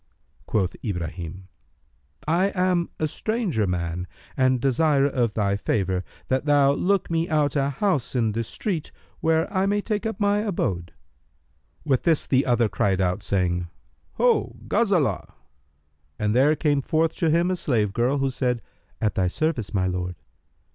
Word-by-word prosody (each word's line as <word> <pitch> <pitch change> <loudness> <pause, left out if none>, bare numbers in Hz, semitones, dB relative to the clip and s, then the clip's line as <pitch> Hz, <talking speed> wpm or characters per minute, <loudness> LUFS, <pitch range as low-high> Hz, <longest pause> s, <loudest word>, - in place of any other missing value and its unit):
Quoth 95 -4 0
Ibrahim, 90 -2 -5 0.8
"I 175 +5 +3
am 180 -2 +1
a 155 - +1
stranger 185 - -1
man 90 0 -2 0.3
and 130 -1 +3
desire 140 +2 +3
of 125 -6 0
thy 100 -2 +1
favour 95 -2 -1 0.2
that 130 +2 0
thou 145 -2 +4
look 190 +3 0
me 165 +1 0
out 150 -3 +1
a 140 -1 +2
house 145 - -1
in 115 -3 +2
this 115 +1 -3
street 175 -8 -3 0.3
where 160 +1 +2
I 190 0 +2
may 205 +1 +1
take 210 +1 -2
up 225 - -5
my 205 0 +2
abode." 95 - -2 0.9
With 135 -4 +2
this 165 -3 +2
the 130 0 +2
other 120 -2 +3
cried 95 -1 0
out, 95 +2 0
saying, 90 -3 0 0.5
"Ho, 475 -3 +2
Ghazбlah![FN#302]"; 195 - +1 0.8
and 105 +4 0
there 140 +5 +4
came 145 -2 +1
forth 160 +4 +1
to 165 - +1
him 170 +3 +2
a - - +1
slave 110 - 0
girl, 125 +5 +1
who 135 -1 0
said, 125 -3 -1 0.4
"At 105 -2 0
thy 95 -1 +1
service, 125 - -1
O - - -14
my 95 -1 +2
lord!" 90 -1 -2
135 Hz, 160 wpm, -24 LUFS, 100-165 Hz, 0.9 s, thou